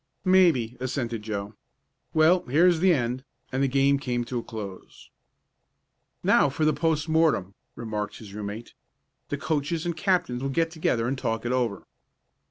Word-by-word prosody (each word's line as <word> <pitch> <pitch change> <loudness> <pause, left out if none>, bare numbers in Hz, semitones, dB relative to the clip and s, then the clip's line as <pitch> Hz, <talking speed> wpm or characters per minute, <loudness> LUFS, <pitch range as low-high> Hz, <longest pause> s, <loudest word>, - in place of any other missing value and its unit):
"Maybe," 165 -11 +4
assented 120 -3 -3
Joe. 105 -1 -4 0.6
"Well, 165 +3 +4
here's 165 +6 +4
the 185 +2 +4
end," 125 -4 0 0.3
and 130 +1 -1
the 140 - +3
game 135 +1 +3
came 125 -3 -1
to 125 0 -3
a - - -7
close. 100 -5 -9 1.1
"Now - - +4
for 150 +3 -1
the 155 - +4
post 160 +1 0
mortem," 155 - +2 0.2
remarked 110 -3 -4
his 105 -3 -11
room 105 -1 -5
mate. 110 +3 -8 0.6
"The 145 - -2
coaches 155 +3 -1
and 170 -1 -1
captain 175 -8 0
will 135 +1 -2
get 165 +4 0
together 120 -8 0
and 135 - 0
talk 115 -1 -2
it 120 - 0
over." 120 -5 -1
130 Hz, 165 wpm, -26 LUFS, 115-160 Hz, 1.1 s, Maybe